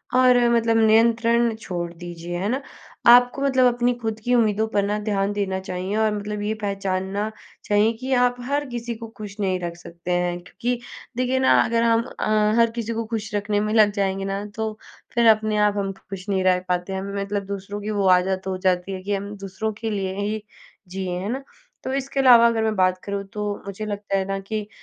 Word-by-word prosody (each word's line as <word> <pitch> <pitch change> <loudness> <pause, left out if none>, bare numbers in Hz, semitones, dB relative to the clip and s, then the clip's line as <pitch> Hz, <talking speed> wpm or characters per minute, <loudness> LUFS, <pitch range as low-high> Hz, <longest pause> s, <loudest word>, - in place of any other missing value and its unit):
और 255 -1 +6
मतलब 230 -1 +3
नियंत्रण 230 +1 +4
छोड़ 175 -6 -5
दीजिए। 175 0 -6
है 190 +3 -2
ना? 260 +4 -1 0.5
आपको 245 +2 +7
मतलब 265 -2 +3
अपनी 245 +1 +1
खुद 225 -2 -4
की 245 - +1
उम्मीदों 220 -1 +2
पर 205 -2 0
ना, 205 +1 0
ध्यान 205 -1 -1
देना 195 -2 -1
चाहिए 185 +1 -4
और 220 -1 +2
मतलब 210 0 -4
ये 210 +1 -1
पहचानना 195 0 -2 0.4
चाहिए 210 +2 +3
कि 260 +1 -4
आप 245 -1 +3
हर 285 +2 0
किसी 240 -1 -4
को 225 +1 -8
खुश 205 -2 -8
नहीं 190 -2 0
रख 170 -1 -4
सकते 170 0 -7
हैं। 175 0 0
क्योंकि 240 +7 -3 0.4
देखिए 255 +1 +1
ना, 260 - +4
अगर 230 0 +1
हम 230 0 +3 0.2
अ, 215 0 +2
हर 230 -1 +4
किसी 230 -1 -3
को 230 0 -3
खुश 215 -1 -3
रखने 205 0 0
में 210 +1 -1
लग 215 -2 +5
जाएँगे 195 0 0
ना, 195 +1 -3
तो 220 -1 -3 0.4
फिर 235 -1 +3
अपने 215 -1 +3
आप 205 - -1
हम 195 -1 -1 0.2
खुश 195 -1 -7
नहीं 190 -2 +1
रह 185 -1 +4
पाते 180 +1 -1
हैं। 190 - -2 0.2
मतलब 200 0 -2
दूसरों 200 +1 -5
की 210 - -4
वो 195 - +2
आदत 190 +1 -2
हो 190 -1 -2
जाती 180 +1 +1
है 185 - -5
कि 205 +1 -2
हम 200 +1 -5
दूसरों 195 +2 -4
के 225 +2 -4
लिए 195 -3 -2
ही 210 +1 -2 0.4
जिए। 190 0 -4
हैं 195 +3 -4
ना? 265 +4 -3 0.4
तो - - -3
इसके 275 0 -2
अलावा 245 -3 +8
अगर 230 -1 +1
मैं 220 -1 0
बात 185 -1 +2
करूँ, 200 0 -3
तो 210 -1 -2
मुझे 200 +2 -5
लगता 205 -1 -2
है 190 - +1
ना 195 0 -2
कि 210 +1 -4
210 Hz, 215 wpm, -23 LUFS, 195-230 Hz, 0.5 s, अलावा